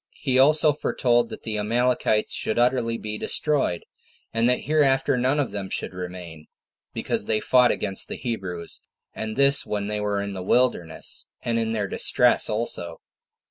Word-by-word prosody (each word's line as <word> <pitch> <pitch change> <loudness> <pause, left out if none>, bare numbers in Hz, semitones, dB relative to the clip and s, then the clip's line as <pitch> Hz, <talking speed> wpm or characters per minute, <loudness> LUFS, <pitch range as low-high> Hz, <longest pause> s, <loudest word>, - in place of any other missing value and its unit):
He 130 -2 +1
also 150 +2 +5
foretold 120 -4 +1
that - - -9
the 110 -2 -3
Amalekites 115 0 +1
should 110 - -1
utterly 120 -1 +1
be 105 -1 -5
destroyed; 145 - 0 0.5
and 115 +1 +2
that 125 - +1
hereafter 135 -3 +2
none 130 +4 +1
of 140 - -1
them 100 -2 -5
should - - -2
remain, 90 -3 -8 0.4
because - - -3
they 110 -1 +1
fought 125 +2 +4
against 95 -2 -2
the - - -5
Hebrews, 95 -9 -4 0.3
and 110 0 -5
this 140 +1 +5
when 105 -1 -3
they 105 0 -3
were 105 -1 -1
in 100 0 -4
the 95 - -6
wilderness, 95 -5 -1 0.2
and 115 -1 0
in 115 0 -1
their 105 -3 -1
distress - - +2
also. 105 -7 -3
115 Hz, 165 wpm, -24 LUFS, 100-125 Hz, 0.5 s, also